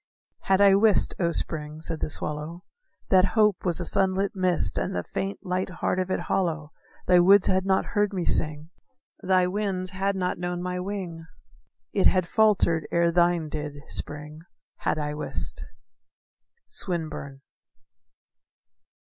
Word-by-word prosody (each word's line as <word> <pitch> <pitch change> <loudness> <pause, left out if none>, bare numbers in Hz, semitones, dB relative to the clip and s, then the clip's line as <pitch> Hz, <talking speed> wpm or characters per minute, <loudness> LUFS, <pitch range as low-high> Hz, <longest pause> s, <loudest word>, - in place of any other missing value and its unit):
"Had 195 +1 +3
I 200 -1 +7
wist, 205 +1 +4
O 170 -2 +1
Spring," 155 -2 -1
said 160 0 -3
the - - -2
swallow, 155 +4 -3 0.5
"That 185 -1 +6
hope 210 -3 +3
was 175 -2 0
a 175 - -3
sunlit 195 +3 0
mist, 180 - 0
And 90 - -3
the 90 - -2
faint, 195 - -4
light 185 +1 -1
heart 180 0 -2
of 185 0 -2
it - - -1
hollow, 160 -5 -2 0.3
Thy 180 -1 +5
woods 190 +2 +6
had 190 0 +1
not 190 0 +2
heard 205 -1 +2
me 185 -4 -3
sing; 155 +1 0 0.5
Thy 185 -1 +3
winds 185 -1 -2
had 195 +1 -1
not 180 -2 -2
known 175 0 -3
my 180 0 -3
wing; 180 -4 -5 0.7
It 195 - +3
had 185 -2 +2
faltered 195 -7 +2
ere 170 0 +2
thine 175 -1 +2
did, 150 -1 -5
Spring, 150 +1 -5 0.4
Had - - -1
I 150 -1 -3
wist." 150 - -2 1.0
_Swinburne. 155 -6 -4
180 Hz, 150 wpm, -26 LUFS, 160-190 Hz, 1.0 s, I